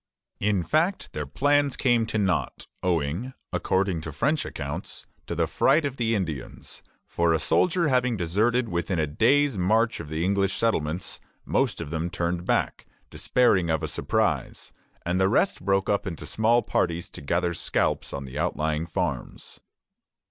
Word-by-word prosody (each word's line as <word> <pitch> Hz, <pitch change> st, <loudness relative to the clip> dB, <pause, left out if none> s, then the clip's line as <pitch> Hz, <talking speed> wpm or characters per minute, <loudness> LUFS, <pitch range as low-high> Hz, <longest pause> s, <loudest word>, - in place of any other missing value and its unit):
In 100 Hz, -3 st, +1 dB
fact, 165 Hz, -, 0 dB
their 75 Hz, -2 st, -4 dB
plans 145 Hz, -, +2 dB
came 120 Hz, -4 st, +2 dB
to 110 Hz, -, -2 dB
nought, 95 Hz, -4 st, -1 dB, 0.2 s
owing, 90 Hz, -, -1 dB, 0.2 s
according 95 Hz, -3 st, 0 dB
to 80 Hz, -, -6 dB
French 145 Hz, -, 0 dB
accounts, 70 Hz, -1 st, -5 dB, 0.2 s
to -, -, -3 dB
the -, -, +2 dB
fright 155 Hz, -1 st, +3 dB
of 135 Hz, -2 st, -3 dB
the 115 Hz, -1 st, +1 dB
Indians; 80 Hz, -, -5 dB, 0.2 s
for 85 Hz, -1 st, +1 dB
a -, -, +3 dB
soldier 170 Hz, -, +2 dB
having 125 Hz, -4 st, +2 dB
deserted 110 Hz, +8 st, +1 dB
within 85 Hz, -1 st, -1 dB
a 80 Hz, -, +2 dB
day's 120 Hz, -, +2 dB
march 110 Hz, +5 st, +2 dB
of 80 Hz, -3 st, -7 dB
the 80 Hz, +2 st, -1 dB
English 100 Hz, 0 st, +1 dB
settlements, 90 Hz, -6 st, -1 dB, 0.3 s
most -, -, 0 dB
of 75 Hz, -, -6 dB
them 80 Hz, +1 st, -2 dB
turned 85 Hz, -1 st, -2 dB
back, -, -, 0 dB, 0.2 s
despairing 95 Hz, -9 st, +2 dB
of 80 Hz, -1 st, 0 dB
a -, -, 0 dB
surprise, -, -, -1 dB, 0.3 s
and 90 Hz, +2 st, +1 dB
the 95 Hz, -, +4 dB
rest 155 Hz, -, +1 dB
broke 95 Hz, 0 st, +1 dB
up 100 Hz, -1 st, 0 dB
into 85 Hz, -5 st, -5 dB
small 115 Hz, +2 st, +2 dB
parties 85 Hz, -1 st, -1 dB
to -, -, -9 dB
gather 85 Hz, +4 st, 0 dB
scalps -, -, -1 dB
on 70 Hz, -, -5 dB
the 65 Hz, +3 st, -6 dB
outlying 80 Hz, -1 st, -1 dB
farms. 85 Hz, -9 st, -4 dB
95 Hz, 160 wpm, -26 LUFS, 80-115 Hz, 0.3 s, the